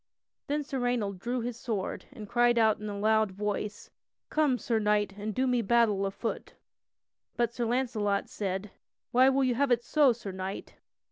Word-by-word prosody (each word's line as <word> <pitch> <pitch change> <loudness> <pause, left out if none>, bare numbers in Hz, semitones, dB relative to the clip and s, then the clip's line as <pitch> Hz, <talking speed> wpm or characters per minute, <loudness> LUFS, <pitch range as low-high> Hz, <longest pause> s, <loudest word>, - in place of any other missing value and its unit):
Then 295 +1 0
Sir 275 -2 -4
Raynold 235 -6 -1
drew 245 +5 -2
his 240 0 -4
sword 215 -7 -3
and 210 - -9
cried 240 +1 +3
out 220 -2 +4
in 210 0 -5
a 200 - -5
loud 220 +1 +3
voice: 210 +2 -4 0.4
"Come, 300 -5 +2
Sir 230 -2 0
Knight, 210 -1 +1
and 210 +1 -5
do 260 - +1
me 250 -2 +2
battle 215 -3 +3
afoot!" 210 +4 -5 0.8
But 235 -1 +1
Sir 240 -1 -2
Launcelot 225 -5 0
said: 195 0 -4 0.4
"Why 255 +2 +6
will 270 0 +2
you 255 -1 +2
have 275 +3 +1
it 240 -1 +2
so, 285 +2 +4
Sir 220 -4 -5
Knight? 190 +1 -6
230 Hz, 180 wpm, -29 LUFS, 205-245 Hz, 0.8 s, Why